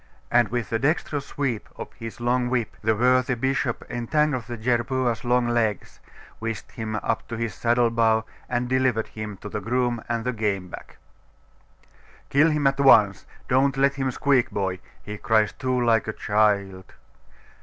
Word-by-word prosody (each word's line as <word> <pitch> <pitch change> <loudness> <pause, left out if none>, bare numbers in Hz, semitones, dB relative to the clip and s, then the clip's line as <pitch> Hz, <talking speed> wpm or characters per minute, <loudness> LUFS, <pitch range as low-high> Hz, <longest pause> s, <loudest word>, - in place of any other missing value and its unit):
And 120 -1 +4
with 115 -1 -3
a 115 - +1
dexterous 145 0 -1
sweep 130 -7 -3
of - - -8
his 115 0 -9
long 125 +1 +1
whip, 120 -3 -1
the 110 +1 +2
worthy 125 +2 +3
bishop 130 0 -1
entangled 130 +2 0
the 120 0 -6
jerboas 120 0 0
long 125 0 +2
legs, 115 -3 -1 0.4
whisked 115 -1 -5
him 110 -1 -5
up 110 +1 -2
to 115 - -5
his 115 -3 -3
saddle 120 +4 +2
bow, 110 -1 +2 0.2
and 120 0 -1
delivered 130 -3 +1
him 105 -2 -7
to - - -5
the 105 - -4
groom 120 +1 -1
and 115 0 -2
the 125 - 0
game 100 -5 -2
bag. - - -10 1.4
'Kill 150 +4 +5
him 150 -2 0
at 135 0 +2
once. 105 -8 +5 0.2
Don't 135 +2 +2
let 140 +1 +3
him 135 -1 -1
squeak, 130 -1 +2
boy! 95 -2 -2 0.2
he 105 0 -7
cries 110 -4 +2
too 130 +2 -1
like 115 -2 +2
a 110 - -2
child.... 100 -3 0
120 Hz, 165 wpm, -24 LUFS, 110-130 Hz, 1.4 s, Kill